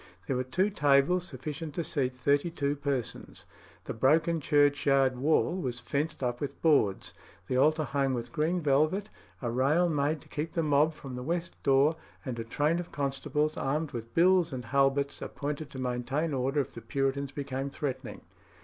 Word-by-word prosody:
There 135 - -1
were 125 - 0
two 185 +11 0
tables 145 +3 +3
sufficient 150 +3 -6
to 170 - -1
seat 130 -5 -1
thirty 140 +5 +1
two 145 -3 -1
persons. 140 -4 -4 0.4
The - - -5
broken 155 +8 +3
churchyard 145 -2 +3
wall 150 +7 +2
was 125 -10 -3
fenced 140 +4 -2
up 120 -1 -2
with 145 - -4
boards, 140 -12 +2 0.3
the 125 - -1
altar 155 +4 +3
hung 135 -1 0
with 120 -1 -5
green 170 +3 0
velvet, 155 +8 +1 0.3
a 120 - -1
rail 145 +8 +3
made 150 0 0
to - - -17
keep 155 +2 -4
the 165 - 0
mob 150 +1 +3
from 135 -4 -8
the 125 - -5
west 170 +5 -2
door, 140 +4 +3 0.3
and 125 -3 -4
a - - -2
train 150 +8 0
of 175 - -6
constables, 145 +2 -1
armed 150 +3 -1
with 115 -1 -7
bills 175 -1 +4
and 125 -2 -5
halberts, 140 +2 +1
appointed 145 +1 -4
to 135 - -8
maintain 130 +5 -1
order 135 +2 +1
if 135 - -7
the - - -8
Puritans 140 -1 -1
became 140 -1 -4
threatening. 140 -1 -5
140 Hz, 175 wpm, -29 LUFS, 130-155 Hz, 0.4 s, bills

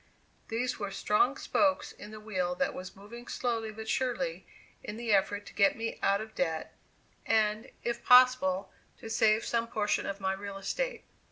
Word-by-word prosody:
These 245 +2 -2
were 200 -2 -3
strong 210 +7 +2
spokes 290 0 +1
in 210 - -11
the 215 0 -9
wheel 185 -5 -2
that 275 - 0
was 185 0 -8
moving 235 +5 -11
slowly 225 -3 -2
but 220 +1 -8
surely 265 - -1 0.4
in 210 - -6
the 230 -2 0
effort 205 +1 +1
to - - -12
get 200 -2 +3
me 225 0 -4
out 200 +1 +2
of 220 0 -8
debt, 160 -3 -2 0.5
and, 215 -1 +1
if 235 0 -2
possible, 250 -7 +5 0.3
to 225 - -8
save 220 0 +3
some 230 0 0
portion 210 -2 0
of 200 0 -4
my 190 -1 0
real 200 0 -6
estate. - - -3
220 Hz, 175 wpm, -30 LUFS, 200-240 Hz, 0.5 s, possible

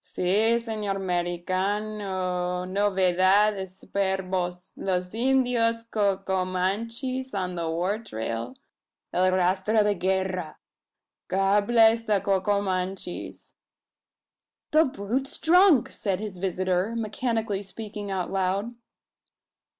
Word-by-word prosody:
Si 210 +6 +2
S'nor 215 -4 -3
Merican 175 -2 -2
cano! 185 -2 -1
Nove 190 -1 +1
dad 200 +3 +5
es 190 -2 -7
s'perbos! 185 -2 -2
Los 180 -1 -2
Indyos 240 -2 +2
Co 200 -3 +2
co 190 -1 -1
manchees_ 230 +8 -2
on 185 -2 -2
the 170 -2 -3
war 180 +6 -1
trail 115 - -5 0.6
el 185 +1 +3
rastro 190 +4 +2
de 205 0 +2
guerra. 185 -3 -1 0.7
God 195 +2 +2
bless 230 -1 +5
the 215 -3 +1
Co 195 -1 +1
co 200 +1 +1
manchees!" 185 -1 -4 1.2
"The 315 +1 +5
brute's 260 +2 -3
drunk!" 330 - +5
said 195 -3 -1
his 205 -4 -6
visitor, 185 +3 0
mechanically 225 -2 -1
speaking 205 0 -7
aloud. 195 +3 -1
195 Hz, 110 wpm, -26 LUFS, 185-220 Hz, 1.2 s, dad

